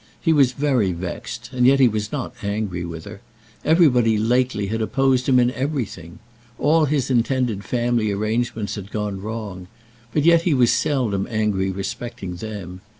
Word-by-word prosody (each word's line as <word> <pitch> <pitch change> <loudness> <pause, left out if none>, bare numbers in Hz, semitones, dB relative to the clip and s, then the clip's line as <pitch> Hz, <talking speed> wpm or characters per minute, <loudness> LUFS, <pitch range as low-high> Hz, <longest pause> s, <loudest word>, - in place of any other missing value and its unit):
He 165 - +2
was 135 -4 +4
very 125 -9 +1
vexed, 85 +1 -6
and 125 -1 +3
yet 135 +1 +5
he 130 - +7
was 110 -1 -2
not 130 -4 -4
angry 100 -4 -2
with 85 -2 -7
her. 100 -1 -10 0.4
Everybody 125 -9 +4
lately 120 -1 +1
had 110 +3 -2
opposed 130 +3 +1
him 130 -1 +5
in 120 0 +3
everything. 125 - -4 0.4
All 155 +2 +3
his 140 -3 0
intended 120 -4 0
family 120 -1 0
arrangements 110 +1 -2
had 100 -2 -7
gone 105 -2 -3
wrong. 105 -4 -6 0.4
But 150 - +1
yet 170 -1 +6
he 170 -4 +1
was 125 -2 +4
seldom 125 -10 0
angry 105 -4 0
respecting 95 0 -5
them. 95 -3 -7
115 Hz, 160 wpm, -22 LUFS, 100-130 Hz, 0.4 s, he